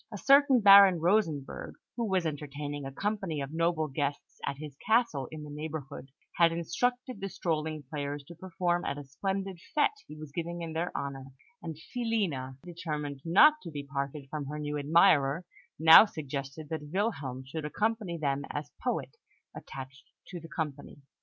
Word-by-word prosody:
A 210 Hz, -, -5 dB
certain 275 Hz, +1 st, +5 dB
Baron 195 Hz, -3 st, +9 dB
Rosenberg, 165 Hz, -6 st, 0 dB, 0.2 s
who 235 Hz, -, -1 dB
was 185 Hz, -3 st, +1 dB
entertaining 145 Hz, -1 st, -4 dB
a -, -, -7 dB
company 195 Hz, -1 st, -2 dB
of 140 Hz, +1 st, -5 dB
noble 165 Hz, -1 st, +1 dB
guests 140 Hz, 0 st, -4 dB
at 140 Hz, -, -3 dB
his 150 Hz, -2 st, -8 dB
castle 220 Hz, -, +1 dB
in 155 Hz, -1 st, -8 dB
the 150 Hz, -, -9 dB
neighbourhood, 150 Hz, -3 st, -6 dB, 0.3 s
had 170 Hz, -1 st, +5 dB
instructed 245 Hz, +8 st, -2 dB
the 195 Hz, -, -3 dB
strolling 155 Hz, -4 st, -2 dB
players 145 Hz, +1 st, -5 dB
to 170 Hz, -, -12 dB
perform 175 Hz, 0 st, -1 dB
at 140 Hz, -, -2 dB
a 145 Hz, -, -6 dB
splendid 190 Hz, +6 st, -3 dB, 0.2 s
fête 295 Hz, -, +5 dB, 0.2 s
he 150 Hz, -, -10 dB
was 155 Hz, -2 st, -9 dB
giving 170 Hz, +2 st, -4 dB
in 165 Hz, -1 st, -5 dB
their 170 Hz, +2 st, -2 dB
honour; 135 Hz, -1 st, -5 dB, 0.4 s
and 165 Hz, -2 st, -6 dB
Filina, 175 Hz, -, -2 dB
determined 150 Hz, -5 st, -5 dB
not 300 Hz, -, +6 dB
to 170 Hz, -, -8 dB
be 145 Hz, -3 st, -6 dB
parted 140 Hz, 0 st, -4 dB
from 150 Hz, -3 st, -4 dB
her 150 Hz, +2 st, -5 dB
new 150 Hz, 0 st, -3 dB
admirer, 150 Hz, +1 st, +4 dB, 0.3 s
now 160 Hz, +6 st, +10 dB
suggested 145 Hz, -3 st, -6 dB
that 155 Hz, -2 st, -5 dB
Wilhelm 150 Hz, -, -2 dB
should 155 Hz, +4 st, -5 dB
accompany 210 Hz, +2 st, -1 dB
them 140 Hz, -2 st, -1 dB
as 145 Hz, 0 st, -5 dB
poet 255 Hz, -, -2 dB, 0.4 s
attached 135 Hz, +1 st, -10 dB, 0.2 s
to 180 Hz, -, -6 dB
the 165 Hz, 0 st, -12 dB
company. 150 Hz, -4 st, -5 dB
155 Hz, 165 wpm, -30 LUFS, 145-185 Hz, 0.4 s, now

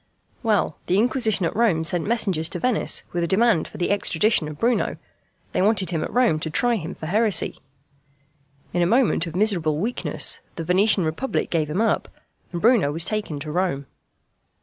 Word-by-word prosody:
Well, 210 Hz, -9 st, 0 dB
the 185 Hz, -, +2 dB
Inquisition 220 Hz, -4 st, +2 dB
at -, -, -2 dB
Rome 205 Hz, -8 st, +2 dB
sent 170 Hz, +1 st, -1 dB
messengers 190 Hz, -8 st, 0 dB
to -, -, -4 dB
Venice 250 Hz, -3 st, 0 dB
with 175 Hz, -1 st, -1 dB
a -, -, 0 dB
demand 205 Hz, -2 st, +2 dB
for -, -, -12 dB
the 175 Hz, -, -1 dB
extradition 200 Hz, -3 st, +2 dB
of 150 Hz, -1 st, -8 dB
Bruno 235 Hz, +6 st, 0 dB, 0.5 s
they -, -, 0 dB
wanted 195 Hz, -2 st, +3 dB
him 165 Hz, -3 st, -1 dB
at -, -, -5 dB
Rome 240 Hz, -11 st, +2 dB
to 160 Hz, -, -4 dB
try 240 Hz, +9 st, +1 dB
him 170 Hz, -1 st, -6 dB
for -, -, -8 dB
heresy. 205 Hz, +1 st, 0 dB, 1.1 s
In 175 Hz, -, +1 dB
a 170 Hz, -, +3 dB
moment 230 Hz, -5 st, +2 dB
of 165 Hz, -, -7 dB
miserable 180 Hz, -7 st, +1 dB
weakness 225 Hz, +9 st, -1 dB, 0.2 s
the 165 Hz, -, -4 dB
Venetian 185 Hz, +2 st, +3 dB
republic 160 Hz, +13 st, -2 dB
gave 155 Hz, -3 st, 0 dB
him 175 Hz, +8 st, -1 dB
up, 225 Hz, -, +1 dB, 0.4 s
and 175 Hz, -, -4 dB
Bruno 220 Hz, -, +3 dB
was 165 Hz, +3 st, -1 dB
taken 210 Hz, -9 st, -3 dB
to 155 Hz, +1 st, -5 dB
Rome. 175 Hz, -5 st, -1 dB
185 Hz, 185 wpm, -23 LUFS, 160-220 Hz, 1.1 s, wanted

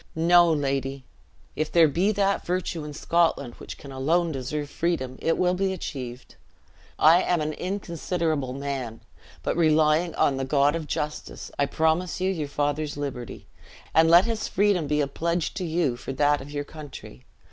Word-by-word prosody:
"No, 170 Hz, +1 st, +5 dB
lady, 135 Hz, -2 st, -1 dB, 0.5 s
if 155 Hz, 0 st, -2 dB
there 165 Hz, 0 st, +6 dB
be 180 Hz, +8 st, +1 dB
that 200 Hz, -1 st, +1 dB
virtue 175 Hz, -2 st, -2 dB
in 150 Hz, -, -6 dB
Scotland 150 Hz, -5 st, +1 dB
which -, -, -8 dB
can 140 Hz, -, -11 dB
alone 160 Hz, +6 st, +1 dB
deserve 145 Hz, +2 st, -3 dB
freedom, 140 Hz, -5 st, -2 dB
it 165 Hz, -, +1 dB
will 180 Hz, 0 st, +2 dB
be 190 Hz, +1 st, 0 dB
achieved. 130 Hz, -8 st, -7 dB, 0.6 s
I 165 Hz, +4 st, +6 dB
am 175 Hz, -1 st, +1 dB
an 155 Hz, 0 st, -2 dB
inconsiderable 170 Hz, -7 st, -2 dB
man, 135 Hz, -4 st, -4 dB, 0.4 s
but -, -, -1 dB
relying 155 Hz, +1 st, +3 dB
on 135 Hz, -, +2 dB
the 135 Hz, -, -2 dB
God 140 Hz, +2 st, +2 dB
of 160 Hz, -2 st, -4 dB
Justice, 150 Hz, 0 st, -4 dB
I 140 Hz, -, +3 dB
promise 160 Hz, +5 st, 0 dB
you 185 Hz, +1 st, +1 dB
your 155 Hz, -6 st, -3 dB
father's 145 Hz, +1 st, -2 dB
liberty; 135 Hz, -5 st, -6 dB, 0.5 s
and 160 Hz, 0 st, +5 dB
let 175 Hz, +3 st, +7 dB
his 230 Hz, -2 st, -2 dB
freedom 195 Hz, -6 st, +2 dB
be 150 Hz, 0 st, +1 dB
a 140 Hz, -, 0 dB
pledge 170 Hz, +3 st, -2 dB
to 190 Hz, -, -4 dB
you 160 Hz, -6 st, 0 dB
for 135 Hz, -, -6 dB
that 145 Hz, +1 st, +2 dB
of 140 Hz, -, -10 dB
your 145 Hz, 0 st, -3 dB
country. 145 Hz, -, -11 dB
155 Hz, 170 wpm, -25 LUFS, 140-175 Hz, 0.6 s, let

